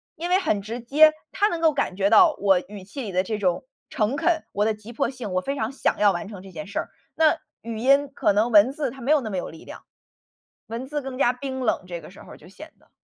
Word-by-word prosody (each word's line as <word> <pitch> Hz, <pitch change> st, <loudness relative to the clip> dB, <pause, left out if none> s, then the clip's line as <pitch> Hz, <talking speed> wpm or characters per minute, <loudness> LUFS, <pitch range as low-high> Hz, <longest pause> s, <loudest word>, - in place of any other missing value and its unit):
因 345 Hz, +3 st, -5 dB
为 370 Hz, -, +4 dB
很 260 Hz, -, 0 dB
直 230 Hz, +4 st, -6 dB
接， 305 Hz, +5 st, +5 dB, 0.2 s
他 415 Hz, -, +2 dB
能 335 Hz, -5 st, -3 dB
够 320 Hz, -1 st, +5 dB
感 275 Hz, -9 st, -2 dB
觉 200 Hz, +1 st, +1 dB
到 350 Hz, -5 st, +6 dB
我 195 Hz, -3 st, +4 dB
语 205 Hz, -2 st, -10 dB
气 235 Hz, +8 st, -8 dB
里 200 Hz, -4 st, -6 dB
的 185 Hz, +1 st, +2 dB
这 215 Hz, +2 st, -3 dB
种 185 Hz, +1 st, 0 dB, 0.3 s
诚 265 Hz, -2 st, -1 dB
恳， 335 Hz, -2 st, +1 dB
我 205 Hz, +1 st, 0 dB
的 220 Hz, -, +2 dB
急 215 Hz, +2 st, -12 dB
迫 235 Hz, -, -1 dB
性， 250 Hz, -7 st, -7 dB
我 185 Hz, -, +1 dB
非 275 Hz, +8 st, -3 dB
常 225 Hz, -1 st, -2 dB
想 275 Hz, -, 0 dB
要 205 Hz, -1 st, +4 dB
完 190 Hz, +3 st, -4 dB
成 200 Hz, -4 st, -9 dB
这 190 Hz, -1 st, -12 dB
件 185 Hz, +4 st, -8 dB
事 200 Hz, -, -3 dB
儿。 -, -, -5 dB, 0.3 s
那 320 Hz, +1 st, +4 dB, 0.2 s
语 230 Hz, -1 st, -6 dB
音 275 Hz, +4 st, +3 dB
可 -, -, +2 dB
能 220 Hz, +4 st, +1 dB
文 215 Hz, +5 st, +6 dB
字 290 Hz, -5 st, -2 dB
它 270 Hz, -, -12 dB
没 260 Hz, +5 st, -1 dB
有 295 Hz, -, +3 dB
那 220 Hz, -, -5 dB
么 190 Hz, -, -3 dB
有 -, -, -4 dB
力 160 Hz, -, -13 dB
量。 -, -, -11 dB, 0.8 s
文 235 Hz, +3 st, -6 dB
字 295 Hz, -1 st, -4 dB
更 265 Hz, -1 st, -6 dB
加 240 Hz, -, +4 dB
冰 260 Hz, +1 st, -6 dB
冷， 220 Hz, -5 st, 0 dB
这 175 Hz, -2 st, -7 dB
个 -, -, -12 dB
时 190 Hz, -, -14 dB
候 -, -, -12 dB
就 160 Hz, -, -17 dB
显 310 Hz, -, -13 dB
得。 -, -, -28 dB
230 Hz, 295 characters per minute, -24 LUFS, 200-285 Hz, 0.8 s, 到